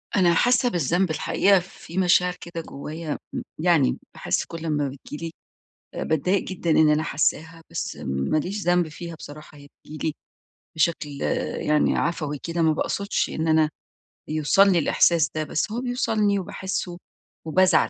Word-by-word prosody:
أنا 175 Hz, -3 st, +4 dB
حاسة 245 Hz, +6 st, +3 dB
بالذنب، 175 Hz, -, +1 dB
الحقيقة، 195 Hz, +5 st, +3 dB
في 175 Hz, -1 st, -11 dB
مشاعر 180 Hz, -1 st, +3 dB
كده 170 Hz, -1 st, -6 dB
جوايا، 155 Hz, +1 st, -6 dB, 0.2 s
م -, -, -2 dB, 0.2 s
يعني 60 Hz, -, +3 dB, 0.2 s
باحس -, -, -1 dB
كل 165 Hz, -, -8 dB
لمّا 150 Hz, -3 st, 0 dB
بتيجي 145 Hz, +4 st, -8 dB
لي 165 Hz, -, -5 dB, 0.7 s
آآ، -, -, -2 dB
باتضايق 180 Hz, +6 st, +1 dB
جدًا 175 Hz, -3 st, -3 dB
إن 155 Hz, -1 st, +5 dB
أنا 150 Hz, +1 st, +2 dB
حاساها، 160 Hz, +2 st, -1 dB
بس -, -, -4 dB
ما 70 Hz, -, 0 dB
ليش 195 Hz, +7 st, -3 dB
ذنب 175 Hz, -1 st, +2 dB
فيها 170 Hz, +2 st, -8 dB
بصراحة. 150 Hz, -1 st, -11 dB
هي 145 Hz, 0 st, -14 dB, 0.2 s
بتيجي 155 Hz, +1 st, -6 dB
لي 155 Hz, -, -3 dB, 0.6 s
بشكل 160 Hz, -1 st, +1 dB, 0.6 s
يعني 150 Hz, 0 st, +3 dB
عفوي 150 Hz, -3 st, -1 dB
كده، 170 Hz, 0 st, -2 dB
ما 160 Hz, -, +4 dB
باقصدش 200 Hz, +5 st, -1 dB
إن 160 Hz, +1 st, -2 dB
أنا 155 Hz, -1 st, +4 dB, 0.6 s
يوصلني 170 Hz, +5 st, +4 dB
الإحساس 165 Hz, -1 st, +3 dB
ده، 155 Hz, -, 0 dB
بس 155 Hz, +6 st, -2 dB
هو 235 Hz, +3 st, -2 dB
بيوصلني 220 Hz, -5 st, +1 dB
وباحسه 185 Hz, -1 st, -4 dB, 0.5 s
وبازعل. 185 Hz, +3 st, +4 dB
165 Hz, 155 wpm, -24 LUFS, 155-180 Hz, 0.7 s, إن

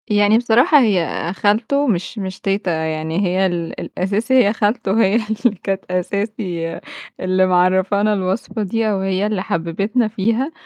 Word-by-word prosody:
يعني 205 Hz, +1 st, +4 dB
بصراحة 245 Hz, +5 st, +4 dB
هي 180 Hz, -, 0 dB
خالته 225 Hz, +9 st, +1 dB
مش 190 Hz, 0 st, -2 dB
مش 190 Hz, -2 st, -5 dB
تيتة، 195 Hz, -2 st, -1 dB
يعني 160 Hz, +3 st, -2 dB
هي 185 Hz, +2 st, +1 dB
ال 175 Hz, -2 st, -3 dB
الأساسي 205 Hz, +7 st, -2 dB
هي 205 Hz, -, +1 dB
خالته 215 Hz, -1 st, 0 dB
هي 195 Hz, +3 st, +2 dB
اللي 220 Hz, 0 st, 0 dB
كانت 195 Hz, -1 st, -2 dB
أساسي 180 Hz, -2 st, -3 dB, 0.4 s
اللي 185 Hz, 0 st, +2 dB
معرّفانا 190 Hz, +3 st, +2 dB
الوصفة 195 Hz, +3 st, -2 dB
دي 220 Hz, +3 st, -1 dB
أو 200 Hz, -, -1 dB
هي 190 Hz, +1 st, 0 dB
اللي 210 Hz, -3 st, -2 dB
حببتنا 195 Hz, +9 st, -1 dB
فيها 225 Hz, +7 st, -1 dB
200 Hz, 145 wpm, -19 LUFS, 185-220 Hz, 0.4 s, يعني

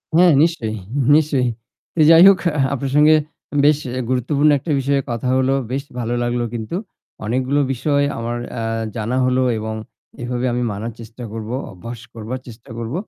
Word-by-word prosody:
হ্যাঁ 175 Hz, 0 st, +6 dB
নিশ্চয়ই, 115 Hz, -10 st, -1 dB, 0.4 s
নিশ্চয়ই। 140 Hz, -5 st, +2 dB, 0.5 s
তো -, -, -3 dB
যাই 165 Hz, +1 st, +8 dB
হোক 195 Hz, -1 st, +7 dB, 0.2 s
আ -, -, -1 dB
আপনার 135 Hz, 0 st, -3 dB
সঙ্গে 150 Hz, +1 st, +6 dB, 0.5 s
বেশ 150 Hz, 0 st, +5 dB, 0.2 s
এ -, -, -1 dB
গুরুত্বপূর্ণ 140 Hz, +4 st, +2 dB
একটা 155 Hz, -, -4 dB
বিষয়ে 140 Hz, +1 st, +1 dB
কথা 120 Hz, +2 st, -3 dB
হল। 130 Hz, 0 st, +1 dB, 0.2 s
বেশ 135 Hz, +1 st, -2 dB, 0.2 s
ভালো 120 Hz, 0 st, -2 dB
লাগলো 120 Hz, 0 st, -1 dB
কিন্তু। 115 Hz, +8 st, -4 dB, 0.5 s
অনেকগুলো 130 Hz, +5 st, 0 dB
বিষয় 145 Hz, +3 st, +1 dB, 0.2 s
আমার 120 Hz, +1 st, -3 dB, 0.2 s
আ -, -, -2 dB, 0.3 s
জানা 115 Hz, +3 st, -2 dB
হলো 130 Hz, 0 st, +2 dB, 0.2 s
এবং 110 Hz, 0 st, -4 dB, 0.5 s
এভাবে 125 Hz, +1 st, -2 dB
আমি 125 Hz, 0 st, -1 dB
মানার 110 Hz, +4 st, -4 dB
চেষ্টা 115 Hz, +2 st, -10 dB
করব। 110 Hz, -1 st, -6 dB, 0.2 s
অভ্যাস 115 Hz, +5 st, -8 dB
করবার 115 Hz, +3 st, -5 dB
চেষ্টা 120 Hz, +3 st, -13 dB
করব। 115 Hz, +2 st, -5 dB
125 Hz, 165 wpm, -20 LUFS, 115-140 Hz, 0.5 s, যাই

